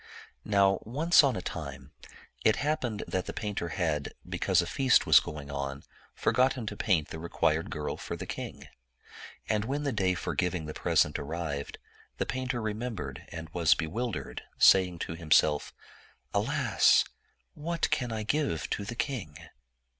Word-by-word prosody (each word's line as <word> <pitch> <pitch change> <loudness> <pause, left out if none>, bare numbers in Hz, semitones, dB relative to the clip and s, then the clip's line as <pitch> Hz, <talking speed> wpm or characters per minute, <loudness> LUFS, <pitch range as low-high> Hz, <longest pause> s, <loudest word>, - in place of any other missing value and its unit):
Now, 100 -2 +3
once 155 +9 +4
on 135 -2 +2
a 90 - -4
time, 70 -5 -6 0.5
it 110 - +5
happened 130 -8 -1
that 95 - -2
that - - -4
painter 105 -5 -3
had, 75 -4 -2
because 95 -2 +1
a 85 - +2
feast 130 +7 +3
was 75 -5 +8
going 70 +2 -7
on, 70 0 -4 0.3
forgotten 130 -2 +2
to 105 - -4
paint 90 -8 +1
the 80 - -6
re 85 +1 -6
quired 80 +2 +1
girl 75 -1 -4
for - - -5
the - - -6
king. - - -7 0.8
And 105 -1 +1
when 140 +4 -2
the 140 - 0
day 95 -5 +1
for - - -3
giving 90 -3 -1
the 75 - -6
present 75 0 +2
arrived, 75 -1 -4 0.4
the - - 0
painter 130 -2 -3
remembered 110 - -4
and 80 -1 -6
was 85 -1 +3
bewil 110 +10 -2
dered, - - -5 0.2
saying 90 -2 +6
to - - -6
himself, 75 -2 +2 0.6
"Alasl - - +4 0.5
what 165 +2 -1
can 125 -2 0
I 110 -1 -2
give 110 - -1
to 100 - -1
the 115 +4 -6
king?" 110 - -3
95 Hz, 160 wpm, -29 LUFS, 80-120 Hz, 0.8 s, was